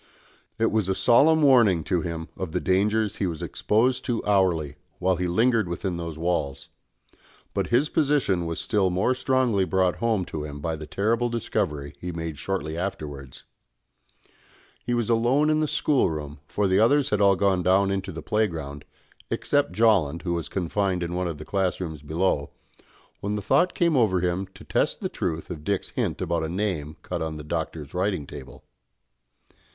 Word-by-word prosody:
It 115 0 +2
was 105 -3 0
a 95 - +1
solemn 155 +9 +5
warning 115 - +5
to 90 +1 0
him 80 -1 -5
of 90 -4 -5
the - - +1
dangers 105 +3 +1
he 100 - 0
was 80 -3 -4
exposed 125 +4 +1
to 120 -2 -2
hourly, 85 -8 +1 0.2
while 95 0 +1
he 90 +1 -1
lingered 110 +3 +2
within 85 +1 -3
those 85 -2 -5
walls; 75 -5 -2 0.8
but - - -1
his 125 +5 +3
position 140 - +1
was 85 - -3
still 100 -4 +1
more 95 +8 +1
strongly 130 -5 +1
brought 95 -1 +1
home 110 -5 0
to 75 -3 -5
him 75 -1 -7
by 80 +2 -2
the 75 0 -8
terrible 115 +7 0
discovery 75 -11 -2
he 90 - -4
made 80 -3 -5
shortly 85 -5 -3
afterwards. 75 -7 -5 1.4
He 120 - -1
was 120 -3 0
alone 125 +6 +3
in 155 - +2
the 155 - +1
schoolroom, 80 - 0
for 105 -1 0
the 95 +1 +3
others 135 +5 +3
had 105 -1 +2
all 100 -1 +5
gone 95 -1 +2
down 95 +2 +3
into 95 -1 -2
the 80 - -7
playground, 80 -10 -2 0.4
except 145 0 +1
Jolland, 95 -9 +2
who 85 - -1
was 85 -2 -3
confined 95 0 -1
in 85 0 -4
one 90 0 -1
of 85 -3 -4
the 75 - -9
class 95 -2 0
rooms 80 -5 -5
below, 75 -1 0 0.7
when 105 +1 -2
the 105 - -2
thought 145 - +2
came 170 -3 +2
over 105 -8 +3
him 90 +2 -1
to - - -12
test - - 0
the - - -3
truth 80 +2 -3
of 75 -4 -7
Dick's 100 +1 -1
hint - - -2
about 85 0 -1
a 80 - -2
name 85 -5 -2
cut 90 -2 -4
on 80 -1 -3
the 75 - -7
Doctor's 80 -2 -4
writing 90 -4 -1
table. 70 -2 -11
95 Hz, 180 wpm, -25 LUFS, 80-110 Hz, 1.4 s, solemn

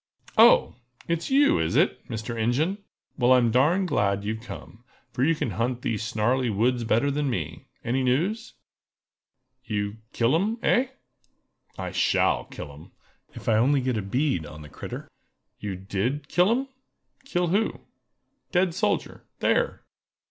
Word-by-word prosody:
"Oh! - - +6 0.3
it's 170 0 -1
you, 280 +2 +4
is 80 0 0
it, - - +2
Mr. 110 +1 -4
Ingen? 135 - 0 0.4
Well, 125 +1 +5
I'm 120 -2 +4
darn 155 +11 +3
glad 100 - +1
you've 110 +2 -3
come, 115 -1 -10 0.3
for 125 - 0
you 165 +4 +3
can 125 - -2
hunt 120 +4 -2
these 110 -2 -1
snarly 120 +3 0
woods 120 +4 +1
better 115 +5 +2
than 145 0 -1
me! 80 - -4 0.2
Any 125 +3 0
news?" 175 - 0 1.1
"You 105 -3 -3
kill 115 +3 +1
'em—eh?" 225 +8 +2 0.9
"I - - -4
shall - - +2
kill 70 - -9
'em, 75 +3 -15 0.4
if - - -10
I 110 - +4
only 135 +5 +3
get 130 -1 -1
a 105 - -1
bead 125 - 0
on 75 0 -10
the 75 - -11
critter!" - - -7 0.5
"You 100 -2 -4
did 100 +10 -3
kill 180 +6 +3
'em?" 260 +4 +1 0.6
"Kill 180 -10 -1
who?" 205 +5 0 0.7
"Dead 180 -1 +2
soldier—there!" 485 - -1
125 Hz, 145 wpm, -26 LUFS, 110-165 Hz, 1.1 s, Oh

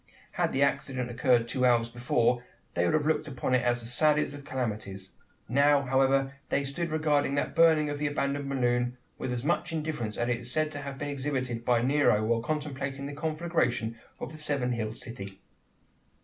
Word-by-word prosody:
Had - - 0
the 135 - +2
accident 130 -3 -1
occurred 120 -1 +3
two 125 +1 -1
hours 120 -2 +4
before, 120 0 +1 0.3
they 85 - +1
would - - +2
have 155 -1 +1
looked 155 0 +1
upon 130 -2 -2
it 130 - +4
as 120 0 +1
the - - -5
saddest 150 +4 +2
of 145 0 -9
calamities. 105 -8 -4 0.4
Now, 140 +3 +4
however, 135 +1 +2 0.2
they 140 - +1
stood 155 +5 -2
regarding 150 -3 +1
the 140 - +2
burning 160 -2 +4
of 145 0 -3
that 150 - 0
abandoned 140 0 -1
balloon, 125 -2 +1 0.2
with 130 - -3
as 125 -1 -2
much 170 +2 0
indifference 150 -9 -3
as 120 - 0
is 120 0 -2
said 155 +2 0
to 145 - -5
have 140 -1 -6
been 145 0 -4
exhibited 130 -4 -2
by 120 -1 +2
Nero, 135 -5 +3
while 115 +1 +1
contemplating 140 -1 -3
the 145 - -5
conflagration 155 -7 -1 0.2
of - - -5
the 155 - -10
seven 140 -5 -1
hilled 110 -2 -3
city! 100 -6 -8
135 Hz, 190 wpm, -29 LUFS, 120-145 Hz, 0.4 s, hours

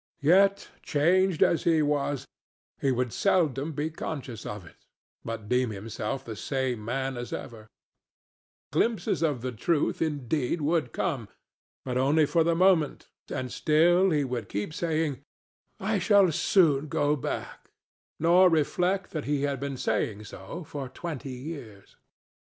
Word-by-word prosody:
Yet, 195 +5 +4
changed 175 +4 +3
as 170 - +2
he 160 -2 +3
was, 145 -2 -1 0.6
he 135 - +2
would 125 -2 -1
seldom 160 -6 +1
be 150 +3 -2
conscious 135 -8 -6
of 105 -4 -6
it, - - -19 0.4
but 115 -2 -6
deem 125 +1 +2
himself 105 +4 -5
the 110 - -6
same 125 +2 -2
man 130 +3 -2
as 120 0 -6
ever; 110 -2 -7 1.0
glimpses 200 +5 0
of 150 -7 0
the 130 +1 -3
truth, 145 +7 0
indeed, 145 -1 -1
would 155 -4 0
come, 135 - -2 0.6
but 125 -1 -1
only 150 +4 +4
for 165 +3 +2
the 165 +1 +2
moment, 175 -4 +2 0.2
and 130 -1 -4
still 175 +5 +4
he 150 -4 +2
would 125 -3 -4
keep 105 +10 -3
saying, 160 -5 -1 0.6
"I 200 +1 0
shall 195 -1 +5
soon 155 -3 +3
go 145 +1 +1
back," 135 - -5 0.5
nor 175 +3 +5
reflect 180 +4 +1
that 155 -3 -4
he 145 0 0
had 140 -2 -1
been 140 -1 -4
saying 105 -2 -1
so 105 - -8
for 140 -3 -6
twenty 150 -2 -6
years. 125 -7 -9
145 Hz, 145 wpm, -27 LUFS, 125-165 Hz, 1.0 s, shall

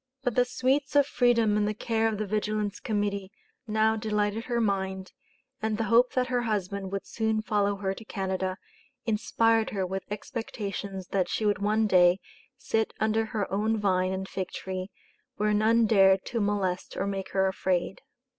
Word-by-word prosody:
But 245 - 0
the 250 +1 +3
sweets 275 +4 0
of 285 -1 +6
freedom 235 -6 +3
in 210 - +2
the 210 0 -1
care 225 +1 0
of 220 -2 -1
the 215 - -2
Vigilance 210 0 -1
Committee 205 -2 -2 0.4
now 220 +1 +2
delighted 215 0 -1
her 240 -1 0
mind, 190 -3 -1 0.5
and 220 -1 -1
the 225 - 0
hope 245 +2 +5
that 255 -1 +2
her 250 -1 +1
husband 200 -4 -2
would 195 -1 -3
soon 220 -1 -1
follow 205 -2 +1
her 195 -1 -2
to 225 - -10
Canada, 190 -3 -2 0.5
inspired 225 0 +2
her 195 -3 -2
with 190 +1 -3
expectations 200 -3 -5
that 190 -2 0
she 220 - -1
would 205 0 +2
one 215 +2 +2
day 180 -2 +5 0.4
"sit 220 -1 -1
under 220 +1 +1
her 220 -3 -2
own 215 +3 +1
vine 185 -3 +1
and 190 0 -3
fig 190 -2 -4
tree 185 0 -5 0.5
where 210 +1 +1
none 225 +2 +4
dared 195 -3 +5
to 230 -2 -2
molest 200 -3 -1
or 195 - 0
make 195 -1 -3
her 190 0 +3
afraid." 190 -1 -1
210 Hz, 175 wpm, -28 LUFS, 195-225 Hz, 0.5 s, of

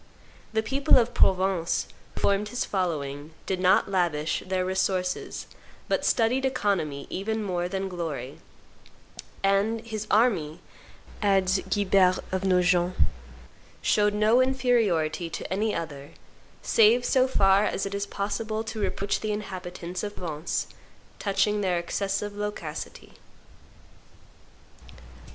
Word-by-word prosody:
The 220 0 0
people 270 +5 +3
of 245 -1 +2
Provence, 185 -3 +2 0.3
who - - -5
formed 200 +1 +1
his 245 - -2
following, 155 -5 -3
did 190 -1 -2
not 185 0 +4
lavish 170 -5 0
their 185 -1 -1
resources, 185 -1 -1 0.4
but - - 0
studied 245 +3 +2
economy 195 - -1
even 220 +3 -2
more 180 -3 -2
than 195 +1 -2
glory," 160 -8 -5 1.0
and 200 +3 +2
"his 215 -2 -5
army," 195 -9 +2 0.6
adds 195 -2 +3
Guibert 190 -2 +3
of 190 0 -1
Nogent, 180 -1 +2 0.9
"showed 210 -1 +3
no 215 +4 +4
inferiority 220 -11 +1
to 175 - -5
any 210 +2 0
other, 145 -4 -6 0.5
save 230 +2 +4
so 260 -1 +3
far 195 -5 +4
as 195 - -1
it 195 - -4
is 200 0 -2
possible 215 +2 -3
to 220 0 -6
reproach 200 0 -1
the 215 - -2
inhabitants 185 -3 -5
of 205 -1 -5
Provence 160 -3 -3 0.5
touching 205 +1 +1
their 185 -3 +1
excessive 200 +4 -2
loquacity." 205 -7 -6
195 Hz, 120 wpm, -26 LUFS, 180-210 Hz, 1.0 s, not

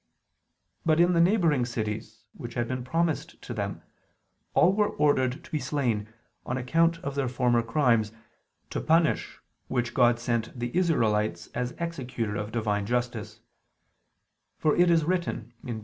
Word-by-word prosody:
But 160 0 +3
in 175 +1 +5
the 170 - +4
neighboring 170 - +3
cities 110 -1 -4
which 120 -1 -8
had 120 -1 0
been 130 0 -3
promised 165 +4 -1
to - - -6
them, - - -4 0.7
all 185 - +5
were 210 0 +2
ordered 145 0 +1
to 170 - -15
be 155 - 0
slain, 115 -8 -1 0.3
on 125 - -3
account 165 +6 +2
of 140 - -3
their 140 -2 -1
former 120 -1 +2
crimes, 115 -3 +2 0.6
to - - -2
punish 165 0 +2 0.3
which 120 -2 -1
God 120 -2 +4
sent 120 0 -2
the 120 0 -3
Israelites 110 - +1
as 125 0 -2
executor 125 -10 -3
of 105 +1 -4
Divine 105 -3 -1
justice: 120 -2 -2 1.2
for 155 - +2
it 175 0 +4
is 165 -2 +4
written 170 - -2
(Deut. 120 -4 -4
125 Hz, 150 wpm, -27 LUFS, 115-160 Hz, 1.2 s, in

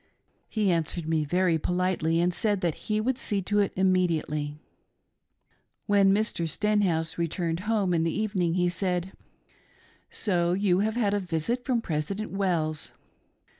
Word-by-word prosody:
He 210 -4 +1
answered 165 0 -1
me 160 -2 +1
very 175 +1 +2
politely 180 -1 0
and 175 +1 +1
said 205 +1 0
that 170 -3 +1 0.2
he 215 0 +2
would 245 +3 0
see 205 -3 +1
to 205 +3 +1
it 200 - +2
immediately. 165 -6 0 1.3
When 200 -2 +4
Mr. 195 -5 0
Stenhouse 180 -5 0
returned 170 0 -1
home 205 -5 +2
in 165 - +2
the 165 - 0
evening 185 -6 0
he 180 -1 +2
said: 180 0 -1 0.5
" - - -32 0.2
So 175 -4 0
you 190 -1 +2
have 215 +2 0
had 210 -4 +1
a 205 - +1
visit 185 +7 -2
from 245 -4 0
Presi 155 +4 -2
dent 215 +2 -5
Wells." 170 -6 -1
180 Hz, 155 wpm, -27 LUFS, 165-205 Hz, 1.3 s, When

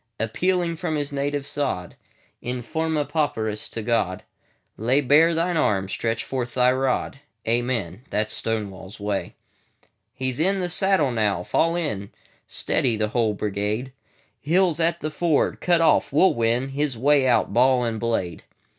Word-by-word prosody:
Appealing 170 - 0
from 165 -2 -2
his 145 -1 -2
native 140 0 -2
sod, 95 -13 -3 0.5
In 125 0 -4
forma 160 +1 -1
pauperis 110 -10 -2
to 115 - -5
God,"Lay 115 +3 -2
bare 150 +5 +4
Thine 170 +1 0
arm! 95 -10 +1
Stretch 115 +3 -2
forth 125 -2 -4
Thy 125 0 +4
rod! 130 +1 -1 0.3
Amen!"—That 115 -2 -1
's - - -1
Stonewall's 100 -3 -4
Way.He 105 +5 -7
's 125 - -7
in 190 +4 +2
the 180 -1 -2
saddle 185 -6 +2
now. 105 -6 0
Fall 165 - +1
in! 110 - -3 0.4
Steady! 120 -3 0
the 105 0 0
whole 110 -2 +1
brigade. 105 +5 -2 0.5
Hill 175 +4 +2
's 155 - -7
at 170 +1 +1
the 155 - -3
ford, 160 -1 +1
cut 175 -2 +3
off; 165 - +3
we 145 - +1
'll 190 - +5
winHis 130 +4 0
way 135 +3 +3
out, 120 -5 +2
ball 125 +1 +4
and 115 -2 -2
blade. 115 -7 -2
130 Hz, 150 wpm, -24 LUFS, 110-155 Hz, 0.5 s, ll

